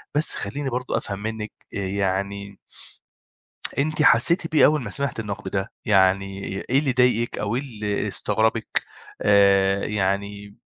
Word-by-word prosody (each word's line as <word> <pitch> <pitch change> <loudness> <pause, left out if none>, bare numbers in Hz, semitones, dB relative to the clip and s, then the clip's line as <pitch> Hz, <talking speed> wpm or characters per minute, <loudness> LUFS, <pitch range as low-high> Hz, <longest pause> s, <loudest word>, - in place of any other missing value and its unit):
بس 150 +1 +3
خلّيني 135 +8 -4
برضه 125 +1 -2
أفهم 100 -1 -4
منِّك 110 0 -5 0.2
آآ - - -2
يعني 100 +1 -3 1.2
أنتِ 155 +2 0
حسّيتِ 165 +9 +5
بإيه 155 - +6
أول 150 -1 +3
ما 115 - -6
سمعتِ 140 +2 -3
النَقْد 100 -3 -5
ده؟ 95 0 -2
يعني 95 -1 +2 0.3
إيه 130 +2 +4
اللي 145 -2 0
ضايقِك 125 -2 +2
أو 105 +2 -2
إيه 130 - -1
اللي 105 -7 -3
استغربِك؟ 110 0 0 0.4
آآ 100 -1 +4
يعني 100 0 -2
105 Hz, 140 wpm, -23 LUFS, 100-125 Hz, 1.2 s, بإيه